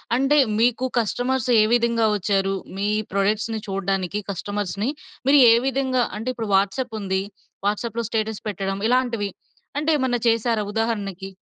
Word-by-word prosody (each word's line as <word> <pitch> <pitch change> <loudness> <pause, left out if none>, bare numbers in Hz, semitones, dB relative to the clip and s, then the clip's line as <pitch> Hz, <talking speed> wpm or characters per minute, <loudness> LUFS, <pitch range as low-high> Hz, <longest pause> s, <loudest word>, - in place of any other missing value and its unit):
అంటే, 270 +4 +3 0.2
మీకు 245 +2 +2
కస్టమర్స్ 245 +3 -1
ఏ - - +5
విధంగా 235 -1 +2
వచ్చారు? 195 -1 0 0.2
మీ 200 - -1 0.3
ప్రొడక్ట్స్‌ని 215 +3 0
చూడ్డానికి 195 +1 -2
కస్టమర్స్‌ని, 205 +3 -3 0.4
మీరు 285 0 +7
ఏ - - +8
విధంగా? 260 -2 +1
అంటే 225 +4 -3
ఇప్పుడు 225 -3 -4
వాట్సాప్ 200 +5 0
ఉంది. 190 -1 -1 0.5
వాట్సాప్‌లో 230 +2 -2
స్టేటస్ 220 -1 -2
పెట్టడం. 195 -1 -3
ఇలాంటివి. 240 -5 +1 0.5
అంటేమన్నా 290 -5 +1
చేసారా 230 -1 +1
ఉదాహరణకి? 200 -4 -2
220 Hz, 125 wpm, -23 LUFS, 200-245 Hz, 0.5 s, ఏ